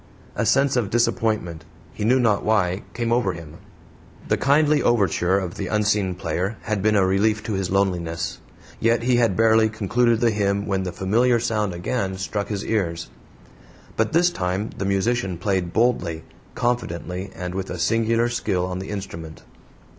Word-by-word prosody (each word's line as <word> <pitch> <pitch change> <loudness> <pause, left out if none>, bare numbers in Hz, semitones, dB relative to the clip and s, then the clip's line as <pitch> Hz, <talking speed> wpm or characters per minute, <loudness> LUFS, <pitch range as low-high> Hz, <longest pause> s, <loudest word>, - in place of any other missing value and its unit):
A - - 0
sense 140 0 +3
of 120 -6 0
disappointment, 110 -8 0 0.3
he 105 - -5
knew 125 +5 +4
not 110 -5 +2
why, 95 -4 +1
came 115 -1 -1
over 115 -6 +1
him. 80 -2 -10 0.7
The - - +4
kindly 150 +2 +3
overture 95 -5 +2
of 90 -3 -4
the 100 - -3
unseen 105 -2 +1
player 90 +4 -2
had 110 -2 -1
been 105 +1 +2
a 100 -2 +4
relief 105 +3 +1
to 110 - -3
his 95 -2 -1
loneliness. 85 -4 -1 0.4
Yet 115 +1 +2
he 125 0 +3
had 115 -6 +2
barely 110 0 +4
concluded 115 +2 +1
the 120 -1 +3
hymn 100 -1 0
when 95 -1 -1
the 95 -1 -3
familiar 115 +7 +2
sound 105 -5 -1
again 95 +1 -2
struck 100 +2 -3
his 100 -2 -4
ears. 85 -6 -2 0.8
But 110 -1 0
this 175 +2 +3
time 95 - -2
the 95 - -3
musician 100 -1 0
played 90 -1 -1
boldly, 90 -9 0 0.3
confidently, 95 -6 -2
and 90 +1 -5
with 95 0 -4
a 90 - -4
singular 115 +5 +1
skill 120 -7 -1
on 90 0 -4
the 95 - -7
instrument. 85 -6 -7
100 Hz, 170 wpm, -23 LUFS, 90-115 Hz, 0.8 s, knew